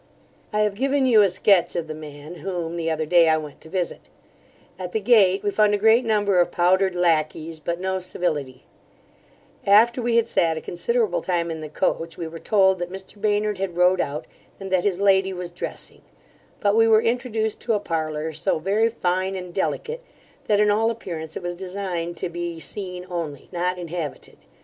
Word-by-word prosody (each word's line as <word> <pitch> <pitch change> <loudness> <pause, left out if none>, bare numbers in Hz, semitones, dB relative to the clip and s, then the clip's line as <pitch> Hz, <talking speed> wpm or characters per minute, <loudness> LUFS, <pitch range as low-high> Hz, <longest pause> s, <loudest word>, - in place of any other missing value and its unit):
I 210 - +1
have 210 -1 +2
given 270 +5 +1
you 230 -4 +6
a 200 - +4
sketch 185 0 +3
of 170 - -1
the 155 - -6
man, 150 +2 -10
whom 175 -3 -4
the 165 -1 -2
other 160 -1 -1
day 170 0 +5
I 160 - +4
went 150 -2 -8
to 160 - -13
visit 180 -1 -2 0.8
At 180 -1 -6
the 220 - +1
gate 200 -4 +4
we 205 - 0
found 210 0 +3
a - - 0
great 220 +4 +4
number 205 -4 +2
of 175 - +3
powdered 185 +2 +2
lacquies, 160 -2 0
but 170 +3 -3
no 190 0 -1
civility 150 -8 -3 1.0
After 230 +5 +5
we 235 0 0
had 230 -1 +3
sat 165 -7 +1
a - - -4
considerable 215 +2 0
time 170 -2 -1
in 160 -1 -5
the 155 - -7
coach, 165 +2 -2
we 170 - -4
were 165 +1 -8
told, 190 -2 +3
that 175 0 -4
Mr 190 +2 -10
Baynard 210 -1 +1
had 185 -3 -3
rode 180 +1 +4
out, 150 +3 -4 0.3
and 195 -1 -7
that 185 -2 +2
his 190 -3 +1
lady 190 -1 +3
was 180 -1 -6
dressing; 175 - -7 0.6
but 205 0 +2
we 225 0 +5
were 220 0 +5
introduced 230 -2 -1
to 235 - 0
a 210 - +1
parlour, 160 -3 -3
so - - 0
very 200 +7 +1
fine 185 -3 -1
and 180 -2 -7
delicate, 470 - -2 0.4
that 205 -1 +2
in 210 0 +4
all 220 +2 +2
appearance 170 -9 -5
it - - -8
was 175 0 -2
designed 180 -2 -4
to - - -3
be 170 -1 -5
seen 180 0 -6
only, 165 -6 -5
not 180 0 -1
inhabited. 170 -3 -6
185 Hz, 195 wpm, -23 LUFS, 170-205 Hz, 1.0 s, you